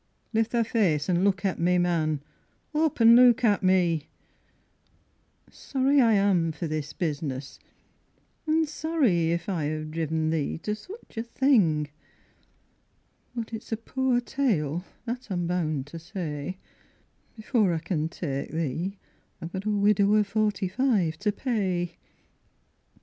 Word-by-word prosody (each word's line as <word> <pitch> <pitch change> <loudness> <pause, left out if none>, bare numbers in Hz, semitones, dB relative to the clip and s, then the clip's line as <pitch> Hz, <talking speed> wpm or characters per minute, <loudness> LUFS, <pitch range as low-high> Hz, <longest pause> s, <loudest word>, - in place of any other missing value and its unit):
Lift 225 0 +2
thy 235 -1 +2
face 180 -10 +1
an' 175 +1 +2
look 200 0 +1
at 190 - 0
me, 180 +1 +3
man, 160 -4 0 0.5
up 310 -2 +1
an' 230 0 +8
look 245 0 +6
at 210 -3 +3
me: 175 -5 +2 1.4
Sorry 275 +1 +1
I 230 -2 +4
am 195 -5 +3
for 165 +2 -5
this 155 -2 -3
business, 145 -4 -4 0.9
an' 320 +1 +3
sorry 290 - +1
if 170 0 -1
I 175 -7 -1
ha'e 155 0 -3
driven 160 0 -1
thee 155 -3 -1
To 210 - -1
such 300 - -11
a - - 0
thing: 215 - +2 1.5
but 230 -1 -5
it's 225 - -7
a 225 - 0
poor 255 +2 0
tale, 180 - -1 0.2
that 245 0 -5
I'm 175 -3 -1
bound 155 -6 -1
to 165 - -5
say, 170 -2 -5 0.8
Before 220 -3 +1
I 165 - 0
can 160 -1 -2
ta'e 140 -5 -4
thee 165 +5 -2 0.4
I've 165 +1 -7
got 190 +1 -4
a - - 0
widow 205 0 +3
of 210 -1 +4
forty 205 -1 0
five 190 -7 +1
to 210 0 +1
pay. 190 -8 -2
190 Hz, 140 wpm, -27 LUFS, 160-225 Hz, 1.5 s, an